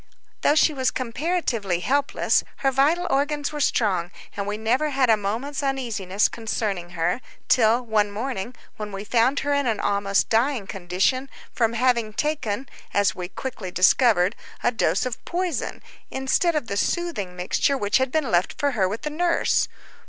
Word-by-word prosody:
Though 295 - +4
she 310 0 +4
was 260 -3 +1
comparatively 245 - -1
helpless, 280 +7 +1 0.2
her 270 - +5
vital 290 +7 +2
organs 290 +1 0
were 300 - -5
strong, 195 - +1 0.3
and 200 0 -3
we 210 +1 -2
never 245 +7 +1
had 265 -4 +3
a - - +6
moment's 225 +8 -3
uneasiness 230 -8 0
concerning 200 -6 -3
her, 175 +9 0 0.3
till 235 0 +4
one 215 -2 +2
morning 235 +1 -4 0.2
when 210 -1 -5
we 195 0 -5
found 240 +5 +2
her 285 +1 0
in 285 -2 +1
an 220 -3 0
almost 200 -1 +1
dying 230 0 +1
condition 190 +9 -1 0.2
from 230 -2 +1
having 235 -2 +1
taken, 265 -4 -2 0.3
as 200 -1 +3
we 180 -1 -5
quickly 205 -2 -6
discovered, 185 +1 +4 0.3
a 245 - +3
dose 240 - +1
of 250 -2 -5
poison, 355 -3 -3 0.3
instead 265 +6 +1
of 300 -5 0
the 200 -2 -3
soothing 210 - -1
mixture 180 +9 +1
which 205 +1 +2
had 260 -1 0
been 300 -6 0
left 175 +2 +2
for 285 -2 +1
her 195 -7 +1
with 215 +7 -5
the 300 - -3
nurse. 340 +2 +1
235 Hz, 165 wpm, -24 LUFS, 200-275 Hz, 0.3 s, a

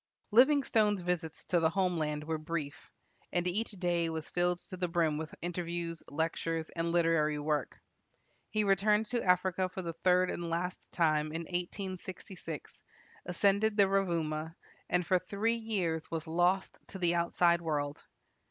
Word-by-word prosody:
Livingstone's 230 -5 +4
visits 175 -2 -3
to 175 - +2
the 160 -1 +3
home 180 0 +1
land 150 -2 -1
were 160 0 -2
brief, 155 -1 -5 0.4
and 175 0 0
each 205 +6 0
day 175 -4 0
was 160 -1 -4
filled 175 0 +2
to 185 - -9
the 180 -1 -1
brim 165 -3 +1
with 155 -1 -6
interviews, 170 -1 -3
lectures, 160 +1 -2
and 170 0 -1
literary 165 -3 +2
work. 150 -1 -2 0.7
He 215 0 +1
returned 210 +2 +3
to 240 -1 +1
Africa 185 0 +2
for 185 0 -6
the 165 -1 -4
third 180 +2 +3
and 170 -1 -4
last 175 +2 -3
time 155 -3 +2
in 160 +2 -4
1866, 180 -2 -6 0.5
ascended 200 +4 +2
the 200 -1 +6
Rovuma, 165 -5 0 0.3
and 180 0 +1
for 185 +2 +3
three 200 +5 0
years 195 -9 -2
was 165 -2 -3
lost 175 +4 +1
to - - -8
the 175 -2 +2
outside 170 0 +3
world. 145 -3 -2
175 Hz, 150 wpm, -32 LUFS, 160-190 Hz, 0.7 s, the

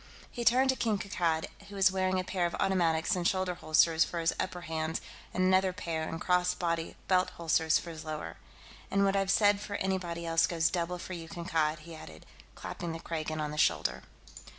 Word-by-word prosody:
He 240 - -4
turned 255 +3 +5
to - - -3
King 220 -4 0
Kankad, 170 -5 -1 0.2
who 205 - -9
was 190 -1 +5
wearing 185 0 +1
a - - -1
pair 180 -2 0
of 170 - -5
automatics 175 -2 +2
in 180 - -2
shoulder 185 0 +1
holsters 160 -1 +3
for 175 - -5
his 165 0 +1
upper 180 -1 -3
hands 160 -1 -2 0.3
and 185 - 0
another 185 0 +3
pair 165 -4 -3
in 165 - -4
cross 180 +1 +2
body 170 -2 -2
belt 185 -1 +3
holsters 160 -1 +2
for 170 - -6
his 155 -2 -8
lower. 155 - -5 0.5
"And 200 0 +2
what 195 0 +2
I've 195 -1 +1
said 205 0 +4
for 205 -1 -5
anybody 180 -3 -2
else 165 0 +3
goes 165 -1 +1
double 180 0 -1
for 185 - -7
you, 165 -2 -7
Kankad," 160 -3 -1
he 165 +1 -11
added, 80 - -11 0.3
clapping 170 -2 -5
the 165 - -6
Kragan 155 -1 -4
on 150 -1 -2
the 150 - -4
shoulder. - - +2
175 Hz, 205 wpm, -30 LUFS, 160-190 Hz, 0.5 s, turned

